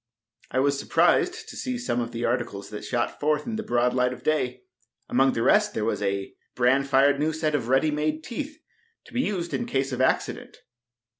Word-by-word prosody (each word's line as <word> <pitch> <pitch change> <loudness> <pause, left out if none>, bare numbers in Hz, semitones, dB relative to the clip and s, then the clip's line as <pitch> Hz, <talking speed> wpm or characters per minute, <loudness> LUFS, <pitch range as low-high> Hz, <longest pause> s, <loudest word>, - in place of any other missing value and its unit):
I - - -3
was 140 +1 +2
surprised - - +2
to - - -9
see 255 -1 -3
some 240 - -1
of 120 0 -4
the 120 +1 -3
articles 120 -5 -2
that 105 - -6
shot 120 -2 -2
forth 150 0 +1
into 220 -1 -3
the - - -12
broad 120 +1 +2
light 125 0 +2
of - - -12
day. 125 -5 0 0.4
Among 135 +1 +3
the 115 - -1
rest 210 - +3
there 110 - -1
was 115 - -1
a 100 -1 -2 0.2
bran 130 +3 +3
fired 140 +1 +4
new 155 +2 +1
set 155 -1 -1
of 130 -6 -1
ready 135 +4 +3
made 155 +1 -1
teeth, 290 - -5 0.5
to - - -16
be 250 - +1
used 185 -8 -2
in 235 - -2
case 135 - -1
of 130 0 -2
accident. 130 - 0
135 Hz, 210 wpm, -26 LUFS, 125-155 Hz, 0.5 s, fired